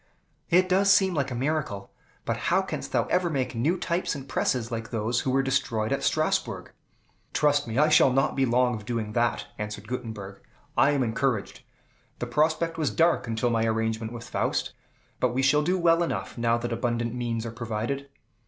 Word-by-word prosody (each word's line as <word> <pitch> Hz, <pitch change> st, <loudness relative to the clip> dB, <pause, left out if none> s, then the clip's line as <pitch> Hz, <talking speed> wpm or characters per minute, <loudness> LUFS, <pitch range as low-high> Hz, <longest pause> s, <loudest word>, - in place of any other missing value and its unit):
"It 185 Hz, +2 st, +4 dB
does 195 Hz, +2 st, +4 dB
seem 190 Hz, -2 st, +4 dB
like 140 Hz, -4 st, 0 dB
a 125 Hz, -, -4 dB
miracle. 125 Hz, -7 st, -2 dB, 0.3 s
But -, -, 0 dB
how -, -, +3 dB
canst -, -, -5 dB
thou -, -, +2 dB
ever 180 Hz, -1 st, +2 dB
make 135 Hz, -5 st, -1 dB
new 145 Hz, +10 st, +1 dB
types 170 Hz, -1 st, -1 dB
and 135 Hz, -1 st, -8 dB
presses 125 Hz, -3 st, -1 dB
like 115 Hz, -1 st, -4 dB
those 115 Hz, +1 st, -1 dB
which 130 Hz, -, 0 dB
were 135 Hz, +1 st, +2 dB
destroyed 115 Hz, -4 st, 0 dB
at -, -, 0 dB
Strasbourg?" -, -, 0 dB, 0.6 s
"Trust 145 Hz, -2 st, +2 dB
me 115 Hz, +1 st, -3 dB
I 150 Hz, +2 st, +5 dB
shall 155 Hz, -3 st, +6 dB
not 135 Hz, +3 st, +1 dB
be 135 Hz, -, +2 dB
long 125 Hz, 0 st, +2 dB
of 110 Hz, -2 st, -5 dB
doing 110 Hz, -1 st, -3 dB
that," 120 Hz, 0 st, +1 dB
answered 105 Hz, 0 st, -5 dB
Gutenberg. 110 Hz, -6 st, -6 dB, 0.3 s
"I 135 Hz, +4 st, +5 dB
am 140 Hz, -3 st, +2 dB
encouraged. 120 Hz, -1 st, -1 dB, 0.6 s
The -, -, -3 dB
prospect 160 Hz, +6 st, 0 dB
was 150 Hz, -4 st, +1 dB
dark 165 Hz, -6 st, +2 dB
until 115 Hz, +1 st, 0 dB
my 115 Hz, -1 st, +1 dB
arrangement 110 Hz, 0 st, -1 dB
with 120 Hz, 0 st, -8 dB
Faust; -, -, -1 dB, 0.5 s
but 125 Hz, -1 st, +1 dB
we 135 Hz, -, +1 dB
shall 140 Hz, +3 st, +4 dB
do 180 Hz, +5 st, +1 dB
well 170 Hz, -1 st, +3 dB
enough, 170 Hz, -, -2 dB
now 115 Hz, -1 st, +1 dB
that 120 Hz, 0 st, -3 dB
abundant 120 Hz, 0 st, -1 dB
means 120 Hz, -2 st, -2 dB
are 115 Hz, -, -4 dB
provided." 115 Hz, +4 st, -4 dB
125 Hz, 190 wpm, -26 LUFS, 115-150 Hz, 0.6 s, shall